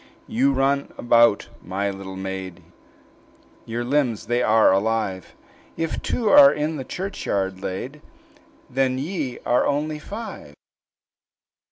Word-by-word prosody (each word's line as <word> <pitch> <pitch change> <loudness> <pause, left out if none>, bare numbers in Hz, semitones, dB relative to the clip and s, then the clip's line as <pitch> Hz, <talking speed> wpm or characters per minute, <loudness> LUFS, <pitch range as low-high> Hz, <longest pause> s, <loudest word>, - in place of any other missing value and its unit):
"You 135 +4 +2
run 135 +1 0
about, 120 -3 +4 0.2
my 100 +2 -2
little 95 -1 -8
maid, 95 -2 -6 1.0
Your 115 +1 -3
limbs 125 -4 0
they 120 +2 0
are 110 -3 +5
alive: 100 -2 -1 0.4
If 165 -1 -2
two 230 - -1
are 285 -1 +9
in 150 +1 -2
the 135 - -4
churchyard 100 - -3
laid, 130 +12 -5 0.7
Then 130 0 0
ye 145 -3 -3
are 120 - +2
only 150 +2 -1
five." 205 - -8
120 Hz, 120 wpm, -23 LUFS, 100-150 Hz, 1.0 s, are